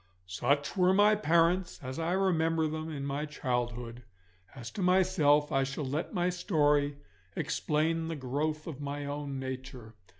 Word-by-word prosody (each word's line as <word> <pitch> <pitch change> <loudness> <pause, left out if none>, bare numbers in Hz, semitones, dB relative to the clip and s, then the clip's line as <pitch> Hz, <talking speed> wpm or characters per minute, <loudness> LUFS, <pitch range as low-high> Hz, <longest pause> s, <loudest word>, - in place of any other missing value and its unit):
Such 140 +10 0
were 185 0 +4
my 205 +1 +6
parents 175 -2 +2
as 130 +3 -5
I 165 +2 0
remember 165 -4 +2
them 155 +1 -4
in 140 -2 -4
my 140 +2 -2
childhood. 120 -4 -3 0.5
As 120 -2 -8
to 200 - -5
myself, 180 -6 +3
I 135 - +2
shall 140 +2 -3
let 145 +5 -3
my 180 -2 +1
story 145 -5 +1 0.4
explain 160 +2 0
the 165 - -3
growth 150 +3 -2
of 145 -4 -7
my 145 0 -4
own 145 -1 -4
nature. 130 -3 -7
150 Hz, 155 wpm, -30 LUFS, 135-165 Hz, 0.5 s, my